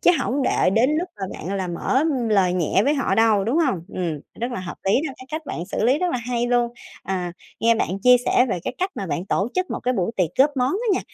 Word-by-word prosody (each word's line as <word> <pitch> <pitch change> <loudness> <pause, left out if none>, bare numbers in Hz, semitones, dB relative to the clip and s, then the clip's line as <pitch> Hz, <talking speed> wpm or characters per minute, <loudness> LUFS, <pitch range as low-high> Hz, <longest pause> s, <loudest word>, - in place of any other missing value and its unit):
chứ - - +6
hổng 270 +2 0
để 250 - +2
đến 230 +7 +3
lúc 355 +3 -1
mà 190 - -2
bạn 190 +5 -5
là 190 -2 -2
mở 215 +10 0 0.3
lời 195 -4 +3
nhẹ 180 +1 +1
với 290 - +3
họ 275 - 0
đâu, 220 -3 +3
đúng 250 +10 +1
hông? 265 - +1
Ừm, 165 -5 -2 0.2
rất 240 +2 -2
là 190 - -3
hợp 180 - -6
lý 195 - +2 0.2
đó, - - -7
cái 255 - -12
cách 310 +1 -3
bạn 170 - -5
xử 215 - -2
lý 260 +5 +3
rất 360 -1 0
là 250 - 0
hay 240 0 -2
luôn, 240 -1 +1 0.3
à, 180 -2 -3 0.3
nghe 230 0 +4
bạn - - 0
chia 250 0 +7
sẻ 250 - +4
về 180 - 0
cái - - -3
cách 370 +2 0
mà 195 - -4
bạn 165 +2 -2
tổ 200 +3 0
chức 370 0 -1
một - - -3
cái 255 +1 +1
buổi 190 -1 0
tiệc 180 -5 +1
góp 275 +3 +6
món 255 +1 +1
á 455 +5 -2
nha, - - 0
235 Hz, 275 wpm, -22 LUFS, 185-265 Hz, 0.3 s, chia